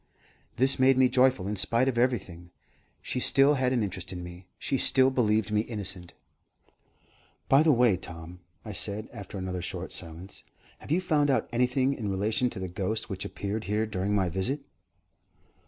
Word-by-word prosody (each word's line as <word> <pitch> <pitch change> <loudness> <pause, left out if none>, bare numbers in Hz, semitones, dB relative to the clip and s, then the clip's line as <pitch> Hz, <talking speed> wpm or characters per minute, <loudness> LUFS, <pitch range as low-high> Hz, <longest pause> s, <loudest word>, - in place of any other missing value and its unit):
This 130 +2 +3
made 130 0 +5
me 130 0 +5
joyful 130 -7 +2
in 105 - -2
spite 115 +6 +2
of 130 - 0
everything. 95 -8 -1 0.5
She - - -2
still 135 +3 +4
had 130 -2 +1
an 120 -4 +1
interest 100 -3 -5
in 90 -1 -6
me; 90 +1 -11
she 135 - -2
still 130 0 +4
believed 110 -4 +1
me 105 0 +2
innocent. 95 -6 -5 1.3
"By 135 +2 +5
the 155 0 +4
way, 120 -7 +4
Tom," 85 -1 -9 0.3
I - - -6
said, 105 +2 -2
after 100 -3 -8
another 95 -1 -4
short - - -5
silence, 85 +4 -6 0.4
"have - - -13
you 170 +5 +2
found 150 -5 +1
out 135 - +1
anything 125 +2 +1
in 110 -6 -4
relation 105 +6 0
to - - -9
the 95 - -4
ghost 100 +5 -3
which 95 0 -4
appeared 105 +2 -4
here 105 +2 0
during 100 -1 -2
my 95 -2 +2
visit?" 95 - -2
110 Hz, 175 wpm, -28 LUFS, 95-130 Hz, 1.3 s, made